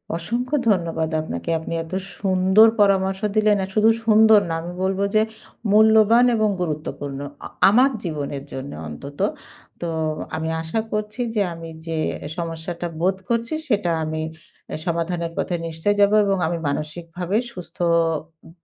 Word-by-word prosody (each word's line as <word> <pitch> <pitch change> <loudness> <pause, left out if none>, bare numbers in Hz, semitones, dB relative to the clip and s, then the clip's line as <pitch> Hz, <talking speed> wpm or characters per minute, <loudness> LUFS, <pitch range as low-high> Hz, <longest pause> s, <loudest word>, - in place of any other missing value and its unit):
অসংখ্য 240 - -2
ধন্যবাদ 165 -4 +1
আপনাকে। 85 - -5
আপনি 160 - -6
এত 165 - -13 0.3
সুন্দর 190 +3 +5
পরামর্শ 190 -1 +3 0.2
দিলেন। 215 -1 +4
আর 190 - -5
শুধু 215 +1 +5 0.2
সুন্দর 220 -1 +7
না, - - -1
আমি 175 +1 -6
বলবো 195 +1 0
যে 215 - +6 0.5
মূল্যবান 220 +2 +6
এবং 215 -1 +2
গুরুত্বপূর্ণ। 150 -4 -4 0.3
আ - - -4 0.2
আমার 250 +6 +5
জীবনের 145 -4 -4
জন্য 135 +2 -6 0.2
অন্তত। 140 - -9 0.6
তো 170 - -2 0.5
আমি 160 0 -2
আশা 165 +8 -2
করছি 210 +3 -3
যে 205 - +2
আমি 165 0 -8 0.2
যে 165 -1 -2 0.4
সমস্যাটা 170 +1 -4
বোধ 190 +1 +2
করছি 235 +4 0
সেটা 205 -7 +1
আমি 155 0 -3 0.5
এ - - -1
সমাধানের 170 0 -1
পথে 175 - -1
নিশ্চয়ই 165 +6 -1
যাবো 200 +1 +5
এবং 195 -1 +1
আমি 170 0 -1
মানসিকভাবে 170 +6 -3
সুস্থ 180 -4 -10
উম 165 -1 0
175 Hz, 145 wpm, -22 LUFS, 160-210 Hz, 0.6 s, সুন্দর